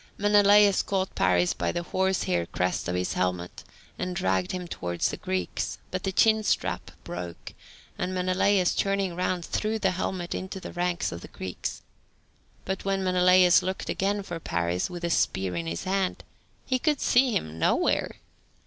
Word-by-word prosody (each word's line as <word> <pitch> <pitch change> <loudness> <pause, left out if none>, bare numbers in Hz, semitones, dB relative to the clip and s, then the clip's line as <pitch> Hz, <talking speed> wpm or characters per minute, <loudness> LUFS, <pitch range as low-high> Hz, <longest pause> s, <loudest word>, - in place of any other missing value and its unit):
Menelaus 205 -1 +5
caught 190 -1 -2
Paris 90 -1 +2
by 85 -1 -1
the 175 - -3
horsehair 175 - 0
crest 90 0 -1
of 90 - -1
his 90 0 -1
helmet, 90 -1 -2 0.4
and 180 0 -3
dragged 95 - 0
him 180 -1 -4
towards 85 - -2
the - - -5
Greeks, 95 -2 -3
but 185 - -2
the 190 - -1
chin 220 +3 +4
strap 215 - -1
broke, 85 -1 -7 0.5
and 180 +1 -1
Menelaus 185 +1 +2
turning 195 -3 0
round 180 -1 -1
threw 220 +1 -1
the 195 -3 +1
helmet 180 -1 -3
into 190 +1 -5
the - - -8
ranks 175 -1 -1
of 85 - -7
the - - -9
Greeks. 95 -1 -6 0.8
But 190 0 -3
when 195 -1 0
Menelaus 180 -1 +5
looked 190 0 -4
again 200 +1 0
for 175 -3 -6
Paris, 90 - -1
with 175 -1 -7
a 170 - 0
spear 95 - 0
in 85 -1 -3
his 85 +1 -3
hand, 190 0 -1 0.4
he 255 0 0
could 300 0 +1
see 250 0 +3
him 80 +1 -3
nowhere! - - +1
180 Hz, 165 wpm, -27 LUFS, -, 0.8 s, Menelaus